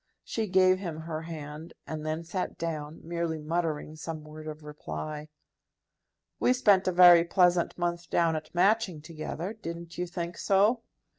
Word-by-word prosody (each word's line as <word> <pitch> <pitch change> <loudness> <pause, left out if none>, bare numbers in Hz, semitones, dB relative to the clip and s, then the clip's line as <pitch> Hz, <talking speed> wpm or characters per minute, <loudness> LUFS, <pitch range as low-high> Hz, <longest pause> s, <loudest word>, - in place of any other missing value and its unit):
She 225 -1 -2
gave 185 0 +4
him 165 -5 -5
her 160 -1 -4
hand, 160 0 -8
and 155 -1 -5
then 155 +1 -2
sat 180 +3 -4
down, 155 -2 -4
merely 170 -1 -2
muttering 155 -1 -2
some 155 0 -6
word 155 +1 -10
of 155 0 -7
reply. 150 - -6 1.1
"We 250 - +4
spent 205 -7 +4
a - - +3
very 175 -1 +8
pleasant 175 0 +2
month 175 -1 -2
down 165 -2 +2
at 155 +2 -6
Matching 190 -2 +2
together; 165 +4 -5
didn't 170 -5 -7
you 180 - -1
think 170 0 -5
so?" 205 +5 +3
170 Hz, 155 wpm, -29 LUFS, 155-180 Hz, 1.1 s, very